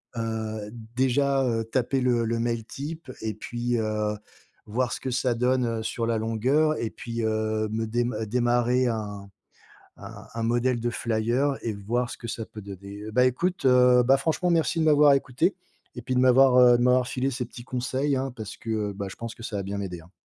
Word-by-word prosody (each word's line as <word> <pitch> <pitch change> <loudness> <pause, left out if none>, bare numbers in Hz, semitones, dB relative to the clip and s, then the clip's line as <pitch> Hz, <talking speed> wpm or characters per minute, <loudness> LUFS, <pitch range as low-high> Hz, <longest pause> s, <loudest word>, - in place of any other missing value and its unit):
Heu, 110 -2 -3 0.3
déjà, 135 +2 +2
heu, 115 -2 0
taper, 130 +3 0
le 120 -2 +2
le 115 +1 -1
mail 115 -1 -1
type 145 +3 -7
et 110 -1 -2
puis, 120 +2 -3
heu, 105 -1 -1 0.5
voir 120 +2 -1
ce - - -3
que 130 - -4
ça 125 0 +1
donne, 125 +1 +1
heu, 115 -1 -2
sur 115 +1 -2
la 115 -1 0
longueur 130 +8 +1
et 115 - -1
puis, 115 +1 -6
heu, 110 0 0
me 110 +1 -1
dé 120 +2 0 0.2
démarrer 120 +2 +2
un 105 -3 -4 0.7
un - - -11
un 115 - -4
modèle 120 +2 +1
de 120 - 0
flyer 120 +5 0
et 115 - -1
voir 115 +5 -2
ce - - -7
que 120 - -8
ça 115 0 -4
peut 110 - -10
donner. 100 +1 -9
Bah 125 +4 +4
écoute, 170 +7 0
heu, 125 -1 +6
bah, 135 +3 +5
franchement 160 +5 0
merci 165 +1 +1
de 160 - +2
m'avoir 150 -2 +6
écouté 130 -2 +1 0.4
et - - -6
puis 130 - -2
de - - +3
m'avoir, 130 0 +6
heu, 125 -1 +7
de 120 - +1
m'avoir 125 0 +3
filé 130 +1 -1
ces 125 -1 -3
petits 120 0 -11
conseils 130 +3 -1
hein 135 -1 -3
parce 110 -4 -7
que, 110 -2 -2
bah, 100 0 -5
je - - -10
pense 115 -1 -7
que 115 - -12
ça 110 - -5
va 100 - -3
bien 100 +1 -4
m'aider 90 -4 -5
hein. 80 - -18
120 Hz, 210 wpm, -26 LUFS, 110-130 Hz, 0.7 s, heu